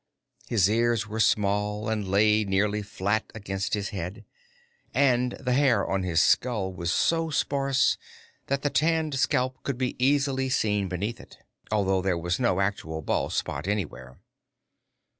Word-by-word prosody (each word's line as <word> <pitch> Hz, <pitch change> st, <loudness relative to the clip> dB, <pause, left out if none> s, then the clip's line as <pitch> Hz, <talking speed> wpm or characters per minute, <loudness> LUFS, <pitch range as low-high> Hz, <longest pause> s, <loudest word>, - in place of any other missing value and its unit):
His 100 Hz, -6 st, +3 dB
ears 115 Hz, +1 st, +1 dB
were 110 Hz, +1 st, -5 dB
small 105 Hz, 0 st, +1 dB
and 110 Hz, -3 st, -2 dB
lay 105 Hz, +2 st, +3 dB
nearly 105 Hz, +2 st, 0 dB
flat 105 Hz, +1 st, -2 dB
against 100 Hz, -1 st, -2 dB
his 100 Hz, -1 st, -3 dB
head, 95 Hz, 0 st, -6 dB, 0.7 s
and 125 Hz, -3 st, +3 dB
the 125 Hz, -, -2 dB
hair 135 Hz, -2 st, +3 dB
on 95 Hz, -, 0 dB
his 85 Hz, -3 st, +1 dB
skull 105 Hz, 0 st, +2 dB
was 85 Hz, -1 st, -2 dB
so 165 Hz, +8 st, +1 dB
sparse 140 Hz, -2 st, +1 dB, 0.5 s
that 140 Hz, 0 st, -1 dB
the 145 Hz, -, 0 dB
tanned 160 Hz, -1 st, +1 dB
scalp 130 Hz, 0 st, 0 dB
could 140 Hz, -3 st, -3 dB
be 130 Hz, -1 st, -2 dB
easily 135 Hz, -1 st, +2 dB
seen 105 Hz, -6 st, +1 dB
beneath 105 Hz, +6 st, -3 dB
it, -, -, -14 dB, 0.3 s
although 95 Hz, -3 st, +1 dB
there 90 Hz, -2 st, 0 dB
was 85 Hz, +1 st, -2 dB
no 110 Hz, -7 st, +2 dB
actual 80 Hz, -5 st, -2 dB
bald -, -, -1 dB
spot -, -, -3 dB
anywhere. 70 Hz, -11 st, -4 dB
105 Hz, 150 wpm, -26 LUFS, 95-130 Hz, 0.7 s, His